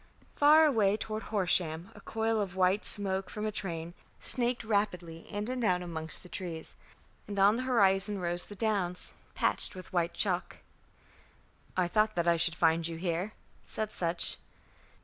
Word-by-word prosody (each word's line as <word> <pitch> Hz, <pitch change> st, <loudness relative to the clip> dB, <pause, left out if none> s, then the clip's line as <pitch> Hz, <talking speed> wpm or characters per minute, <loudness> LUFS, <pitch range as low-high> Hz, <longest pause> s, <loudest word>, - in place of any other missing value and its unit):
Far 305 Hz, +2 st, +6 dB
away 215 Hz, -8 st, +3 dB
toward 215 Hz, 0 st, -4 dB
Horsham 180 Hz, -4 st, 0 dB
a -, -, -14 dB
coil 225 Hz, -1 st, -1 dB
of 190 Hz, -3 st, -4 dB
white 190 Hz, +2 st, +2 dB
smoke 195 Hz, -2 st, -1 dB
from 210 Hz, 0 st, -5 dB
a 215 Hz, -, -1 dB
train 170 Hz, -4 st, -4 dB, 0.3 s
snaked 245 Hz, -1 st, +5 dB
rapidly 180 Hz, -6 st, -2 dB
in 205 Hz, +1 st, -3 dB
and 255 Hz, -1 st, -3 dB
out 180 Hz, -4 st, +1 dB
amongst 160 Hz, -2 st, -1 dB
the -, -, -12 dB
trees; 170 Hz, -3 st, -6 dB, 0.5 s
and 205 Hz, -, -6 dB
on 200 Hz, +2 st, +5 dB
the 245 Hz, -, -2 dB
horizon 200 Hz, -3 st, +3 dB
rose 175 Hz, 0 st, +1 dB
the 205 Hz, -, -10 dB
Downs, 195 Hz, -5 st, -1 dB, 0.2 s
patched -, -, +2 dB
with 185 Hz, 0 st, -11 dB
white 170 Hz, -1 st, 0 dB
chalk. 180 Hz, -3 st, -1 dB, 1.2 s
"I 180 Hz, -1 st, +2 dB
thought 215 Hz, +4 st, +1 dB
that 170 Hz, -1 st, 0 dB
I 170 Hz, -, +5 dB
should 165 Hz, 0 st, +1 dB
find 165 Hz, 0 st, +2 dB
you 165 Hz, -1 st, -5 dB
here," 175 Hz, +4 st, -2 dB, 0.3 s
said 215 Hz, -1 st, -3 dB
Sutch. 170 Hz, -1 st, 0 dB
190 Hz, 165 wpm, -30 LUFS, 170-215 Hz, 1.2 s, Far